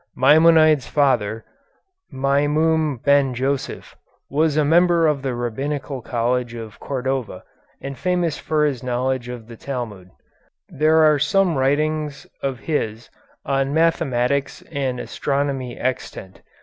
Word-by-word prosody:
Maimonides' 155 Hz, +1 st, +5 dB
father, 115 Hz, -7 st, +1 dB, 0.7 s
Maimum 145 Hz, +2 st, +1 dB
Ben 140 Hz, -3 st, +3 dB
Joseph, 135 Hz, +2 st, -3 dB, 0.4 s
was 155 Hz, +1 st, +1 dB
a 150 Hz, -, +3 dB
member 170 Hz, +2 st, +4 dB
of 150 Hz, -3 st, +1 dB
the 130 Hz, -2 st, -2 dB
Rabbinical 135 Hz, +3 st, -3 dB
College 120 Hz, +1 st, -1 dB
of 110 Hz, -2 st, -9 dB
Cordova, 130 Hz, -7 st, -3 dB, 0.4 s
and 140 Hz, 0 st, -6 dB
famous 175 Hz, -2 st, -1 dB
for 155 Hz, -1 st, +1 dB
his 135 Hz, -5 st, -1 dB
knowledge 125 Hz, 0 st, -2 dB
of 120 Hz, -2 st, -7 dB
the 115 Hz, -, -10 dB
Talmud. 110 Hz, -8 st, -6 dB, 0.6 s
There 155 Hz, +2 st, +3 dB
are 150 Hz, -2 st, +4 dB
some 185 Hz, +3 st, +2 dB
writings 150 Hz, +2 st, 0 dB, 0.2 s
of 135 Hz, -3 st, -3 dB
his 115 Hz, -7 st, -3 dB, 0.3 s
on 135 Hz, +1 st, 0 dB
mathematics 140 Hz, -4 st, 0 dB
and 135 Hz, -4 st, -2 dB
astronomy 140 Hz, -3 st, -2 dB
extant. 125 Hz, -6 st, -4 dB
140 Hz, 120 wpm, -21 LUFS, 125-150 Hz, 0.7 s, Maimonides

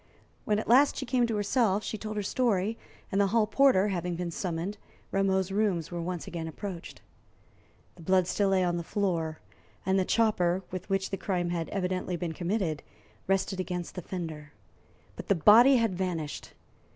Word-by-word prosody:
When 210 Hz, -, +2 dB
at 215 Hz, -, -3 dB
last 265 Hz, +5 st, +5 dB
she 265 Hz, -, -3 dB
came 245 Hz, -1 st, +2 dB
to 225 Hz, -, -2 dB
herself, 210 Hz, -1 st, +1 dB
she -, -, -4 dB
told 215 Hz, 0 st, -5 dB
her 205 Hz, -, -1 dB
story, 215 Hz, -2 st, 0 dB, 0.4 s
and, 195 Hz, -, +2 dB
the 200 Hz, -, +3 dB
hall 220 Hz, +2 st, +3 dB
porter 220 Hz, -4 st, +4 dB
having 175 Hz, -2 st, -2 dB
been 175 Hz, 0 st, -3 dB
summoned, 175 Hz, +3 st, -3 dB, 0.3 s
Rameau's 190 Hz, -1 st, +1 dB
rooms 195 Hz, -6 st, 0 dB
were 175 Hz, -, -4 dB, 0.3 s
again 165 Hz, -1 st, -5 dB
approached. 175 Hz, +1 st, -7 dB, 1.0 s
The -, -, -13 dB
blood 185 Hz, +2 st, +3 dB
still 200 Hz, +2 st, +1 dB
lay 190 Hz, -1 st, +3 dB
on 175 Hz, -1 st, 0 dB
the 170 Hz, -, -3 dB
floor, 165 Hz, -5 st, -2 dB, 0.4 s
and 190 Hz, +1 st, +2 dB
the -, -, +3 dB
chopper, 190 Hz, -4 st, +1 dB
with 185 Hz, +2 st, -6 dB
which 195 Hz, 0 st, 0 dB
the 195 Hz, -, -2 dB
crime 175 Hz, -2 st, -1 dB
had 170 Hz, -2 st, -2 dB
evidently 185 Hz, -2 st, -2 dB
been 170 Hz, -1 st, -3 dB
committed, 175 Hz, -3 st, -1 dB, 0.5 s
rested 190 Hz, 0 st, 0 dB
against 180 Hz, -2 st, -4 dB
the 180 Hz, -, -5 dB
fender; 160 Hz, -4 st, -6 dB, 0.6 s
but -, -, -8 dB
the 200 Hz, -, +3 dB
body 230 Hz, -, +7 dB
had 230 Hz, -5 st, +2 dB
vanished! 170 Hz, -5 st, -4 dB
190 Hz, 175 wpm, -29 LUFS, 175-210 Hz, 1.0 s, body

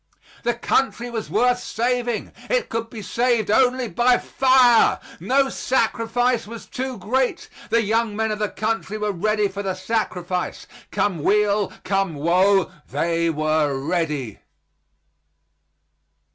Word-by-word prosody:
The 240 Hz, 0 st, 0 dB
country 240 Hz, 0 st, 0 dB
was 225 Hz, -2 st, -4 dB
worth 245 Hz, 0 st, +2 dB
saving; 240 Hz, -1 st, -2 dB, 0.2 s
it -, -, 0 dB
could 230 Hz, 0 st, -3 dB
be 220 Hz, -3 st, -8 dB
saved 235 Hz, -3 st, +1 dB
only 250 Hz, +2 st, +3 dB
by 245 Hz, +2 st, +3 dB
fire; 255 Hz, -3 st, +4 dB, 0.2 s
no 265 Hz, +10 st, +2 dB
sacrifice 240 Hz, -2 st, 0 dB
was 230 Hz, 0 st, -9 dB
too 260 Hz, -1 st, -5 dB
great; 250 Hz, +6 st, -1 dB, 0.2 s
the 230 Hz, 0 st, +3 dB
young 220 Hz, 0 st, 0 dB
men 220 Hz, 0 st, 0 dB
of 210 Hz, -, -3 dB
the 210 Hz, -1 st, 0 dB
country 215 Hz, -1 st, -2 dB
were 210 Hz, -1 st, -1 dB
ready 210 Hz, +3 st, +1 dB
for 195 Hz, +1 st, -6 dB
the 190 Hz, -2 st, -2 dB
sacrifice; 185 Hz, -3 st, -3 dB, 0.2 s
come 185 Hz, -7 st, -1 dB
weal, 205 Hz, +2 st, +2 dB
come 195 Hz, -4 st, 0 dB
woe, 185 Hz, +5 st, +3 dB, 0.2 s
they 170 Hz, 0 st, 0 dB
were 155 Hz, -2 st, +1 dB
ready. 150 Hz, -, -2 dB
215 Hz, 130 wpm, -22 LUFS, 185-240 Hz, 0.2 s, fire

